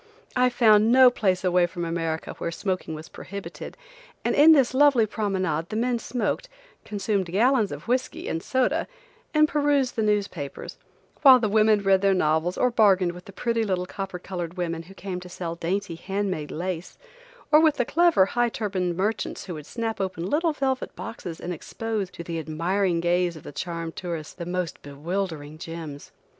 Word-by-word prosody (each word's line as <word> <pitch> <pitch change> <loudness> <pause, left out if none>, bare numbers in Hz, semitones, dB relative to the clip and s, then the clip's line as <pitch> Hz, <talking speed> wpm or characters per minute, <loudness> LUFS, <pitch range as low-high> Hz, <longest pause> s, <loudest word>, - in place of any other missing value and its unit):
I 250 0 +4
found 220 -2 +5
no 255 0 +8
place 190 -6 0
away 180 -1 +3
from 175 -1 -5
America 165 -1 -3
where - - -2
smoking 185 -2 -3
was 155 +1 -9
prohibited, 200 +1 -8 0.5
and - - +2
in 300 +3 +7
this 270 -5 +4
lovely 270 -4 +5
promenade 190 -7 -1
the 215 - -5
men 240 +1 0
smoked, 250 - -2 0.3
consumed 200 -2 -1
gallons 220 +4 +2
of - - -8
whiskey 255 +2 -1
and 165 - -2
soda 260 +6 0 0.4
and 305 -1 +4
perused 285 -4 +1
the 225 - 0
newspapers, 200 -9 -2 0.4
while 265 -3 +9
the 230 -3 0
women 215 0 +3
read 195 -1 +4
their 195 -1 +3
novels 160 +1 +1
or 250 - +2
bargained 195 -6 +4
with 180 +1 -12
the - - -11
pretty 230 +3 -1
little 185 -4 -1
copper 195 -1 -5
colored 175 -1 -6
women 165 -2 -2
who 185 +4 -14
came 185 -1 -5
to 180 0 -11
sell 170 -2 -5
dainty 180 +2 -2
hand 195 +4 -2
made 155 -4 -4
lace, 175 +1 -5 0.5
or 305 - +8
with 315 -2 +4
the 245 - 0
clever, 335 - +4
high 240 +4 +1
turbaned 190 -6 -2
merchants 210 +4 -2
who 180 - -6
would 150 -2 -8
snap 225 -3 -3
open 185 -2 -3
little 320 - +1
velvet 265 -2 -2
boxes 175 -7 -7
and 180 - -4
expose, 215 +3 -4
to 170 - -9
the 165 -1 -4
admiring 170 +3 0
gaze 175 0 +1
of 155 - -11
the - - -8
charmed 165 +1 -5
tourists, 170 -4 -5
the 170 -2 -7
most 180 -2 -3
bewildering 155 +1 -4
gems. 160 -4 -8
190 Hz, 180 wpm, -25 LUFS, 170-230 Hz, 0.5 s, while